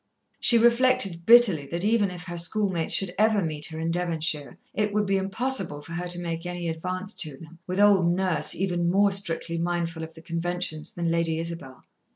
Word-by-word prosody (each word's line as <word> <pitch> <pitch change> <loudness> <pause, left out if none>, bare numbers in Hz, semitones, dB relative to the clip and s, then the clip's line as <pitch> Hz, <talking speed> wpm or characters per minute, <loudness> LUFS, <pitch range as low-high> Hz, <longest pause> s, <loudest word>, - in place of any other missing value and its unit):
She 235 - +5
reflected 235 -7 +2
bitterly 220 -12 +6
that 170 +6 -3
even 215 -2 +2
if 180 -1 -8
her 175 -2 -6
schoolmates 180 -1 0
should 190 -2 +1
ever 215 -2 +3
meet 155 -2 -2
her 160 -1 -7
in 165 +1 -2
Devonshire, 165 -4 -1 0.2
it 210 -1 -1
would 210 0 +1
be 195 0 +1
impossible 195 - -1
for 165 - -12
her 175 +1 -4
to 175 0 0
make 165 -1 -4
any 175 -1 -5
advance 185 +5 -4
to 150 -5 -4
them, 165 +2 -14
with 185 +1 -3
old 200 -4 +4
Nurse, 175 -4 0
even 175 -2 -1
more 200 +2 +3
strictly 170 -3 -2
mindful 170 -1 -2
of 160 0 -10
the 160 - -14
conventions 170 0 -3
than 175 -5 -3
Lady 165 -1 0
Isabel. 165 -6 -7
175 Hz, 195 wpm, -25 LUFS, 165-195 Hz, 0.2 s, bitterly